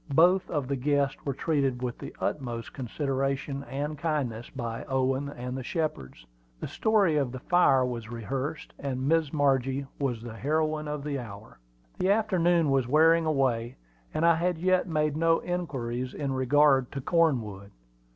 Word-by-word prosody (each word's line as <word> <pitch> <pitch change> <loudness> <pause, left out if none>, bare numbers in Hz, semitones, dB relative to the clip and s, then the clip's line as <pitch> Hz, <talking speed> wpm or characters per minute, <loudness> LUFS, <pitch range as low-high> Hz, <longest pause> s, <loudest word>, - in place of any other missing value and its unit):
Both 180 +4 +5
of 145 -5 -2
the 140 - -1
guests 140 +1 0
were 140 -2 -2
treated 135 -6 0
with 120 -1 -3
the - - -8
utmost 120 -5 -3
consideration 135 +1 -2
and 145 +2 -4
kindness 140 -8 -2
by 115 -3 -5
Owen 130 +1 0
and 125 -2 -6
the 130 - -4
Shepards. 125 - -4 0.3
The - - -4
story 205 -8 +2
of 135 -4 0
the 130 - -6
fire 135 -3 +3
was 120 -3 -5
rehearsed, 130 +6 -4
and 130 -1 -3
Miss 160 -2 +2
Margie 135 -2 +1
was 125 -5 -2
the 115 -2 -7
heroine 155 +2 0
of 150 -1 -4
the 145 -2 -2
hour. 105 - -10 0.4
The 185 - +1
afternoon 175 -7 +3
was 135 -3 +2
wearing 160 +4 +4
away, 125 -6 0 0.4
and 160 - 0
I 170 - +7
had 170 +1 0
yet 185 +2 +2
made 150 -3 0
no 165 +1 +3
inquiries 130 -8 -3
in 140 -2 -2
regard 135 0 +3
to 135 - -4
Cornwood. 125 - +1
140 Hz, 160 wpm, -28 LUFS, 125-155 Hz, 0.4 s, I